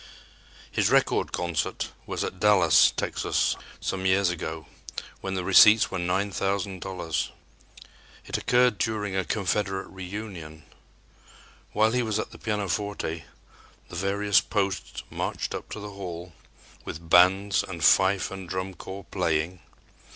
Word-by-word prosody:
His - - +2
record - - +2
concert 85 -3 -2 0.2
was - - -2
at 95 - -5
Dallas, 95 -6 +6
Texas, - - 0 0.2
some 95 -1 -2
years 95 -1 +3
ago, 80 -2 -5 0.5
when 95 0 -4
the 95 - -2
receipts 105 +4 +7
were 95 - -2
$9,000. 95 -2 -2 1.0
It - - -4
occurred 125 -4 +3
during 105 -3 -1
a 95 - +1
Confederate 95 -1 -1
reunion. 90 -5 -8 1.1
While 110 +1 +3
he 125 +1 +1
was 110 -3 -1
at 110 - -3
the - - -13
pianoforte, 100 -5 -2 0.6
the - - -9
various 100 +3 +2
posts 100 -3 -2
marched - - -3
up - - -6
to - - -6
the 105 0 -7
hall 90 -3 -7 0.5
with 80 +2 -8
bands 95 +4 +5
and 85 -4 -6
fife 95 +4 +4
and 95 -2 -8
drum 95 +1 -3
corps 95 +2 -9
playing. 85 -1 0
95 Hz, 130 wpm, -26 LUFS, 90-100 Hz, 1.1 s, receipts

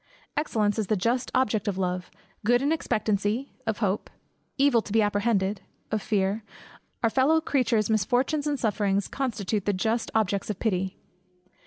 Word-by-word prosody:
Excellence 220 -8 +1
is 210 - -1
the 215 - +2
just 235 +6 0
object 220 -6 +1
of 200 -2 -1
love; 180 -1 -2 0.3
good 245 +4 +3
in 285 - +2
expectancy, 215 -4 0 0.2
of 220 -2 0
hope; 195 +1 -1 0.5
evil 275 -4 +4
to 210 - -10
be 225 - +3
apprehended, 205 -1 +1 0.3
of 215 -1 0
fear; 200 +1 0 0.6
our 230 - +4
fellow 275 +6 +4
creatures' 240 -8 +1
misfortunes, 245 +8 +1
and 290 -2 0
sufferings, 205 -3 +1
constitute 215 -6 -2
the 205 - +2
just 220 +5 0
objects 200 -2 +1
of 210 - -2
pity. 190 -4 -1
215 Hz, 155 wpm, -27 LUFS, 200-245 Hz, 0.6 s, evil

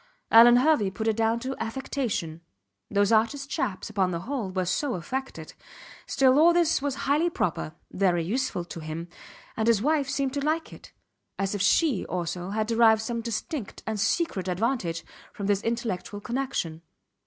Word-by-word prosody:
Alvan 235 +2 +9
Hervey 255 -7 +3
put 205 +4 -4
it 220 - +2
down 225 +1 +1
to 265 +2 -3
affectation. 225 - -3 0.5
Those 200 0 +2
artist 230 +6 +1
chaps, 205 -8 -2
upon 200 -4 0
the 170 -2 -3
whole, 235 -1 -3
were 185 0 -1
so 245 - -1
affected. 265 +10 -5 0.5
Still, 265 0 +4
all 340 +2 +6
this 340 -4 +2
was 280 -2 -1
highly 300 +5 +2
proper 160 - -2 0.2
very 180 -3 +1
useful 210 -2 -2
to 170 - -8
him 160 +2 -6 0.5
and 220 0 -1
his 230 -3 +4
wife 285 +3 +1
seemed 275 -1 -1
to 285 -1 -2
like 315 +2 -1
it - - -14 0.5
as 195 0 -1
if 205 - -2
she 260 - +3
also 175 0 -3
had 215 +2 -1
derived 225 -1 +4
some 235 0 -3
distinct 230 +2 -5
and 220 -1 -3
secret 200 - 0
advantage 180 -3 -1 0.3
from 200 - -5
this 200 0 +1
intellectual 225 -4 -3
connection. 235 -9 -3
225 Hz, 165 wpm, -26 LUFS, 190-270 Hz, 0.5 s, Alvan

